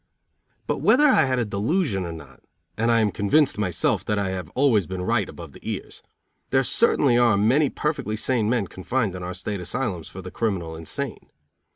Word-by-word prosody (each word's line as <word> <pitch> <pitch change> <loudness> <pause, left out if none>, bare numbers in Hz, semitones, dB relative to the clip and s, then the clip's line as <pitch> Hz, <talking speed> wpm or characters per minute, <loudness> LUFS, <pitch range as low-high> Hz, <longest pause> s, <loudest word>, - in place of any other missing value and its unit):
But - - -1
whether 295 +4 +5
I 160 - +5
had 130 -1 0
a 120 - +1
delusion 105 - -1
or - - -5
not 80 -5 -12 0.3
and 115 +2 0
I 115 -1 +4
am 105 -2 +2
convinced 110 +6 +2
myself 90 -5 0
that 105 - 0
I 100 -2 0
have 90 -4 -5
always 120 - +3
been 95 -1 -4
right 110 -1 0
above 85 -4 -10
the - - -14
ears - - -6 0.5
there 135 0 +3
certainly 130 - +3
are 120 -4 +4
many 130 +8 +3
perfectly 150 -8 -2
sane 110 -1 0
men 120 -4 +1
confined 105 +3 -2
in 90 - -7
our 90 0 -5
state 100 +2 -4
asylums 95 -3 -3
for 95 - -9
the 90 - -8
criminal 90 -8 -2
insane. 80 -1 -6
105 Hz, 195 wpm, -24 LUFS, 95-125 Hz, 0.5 s, whether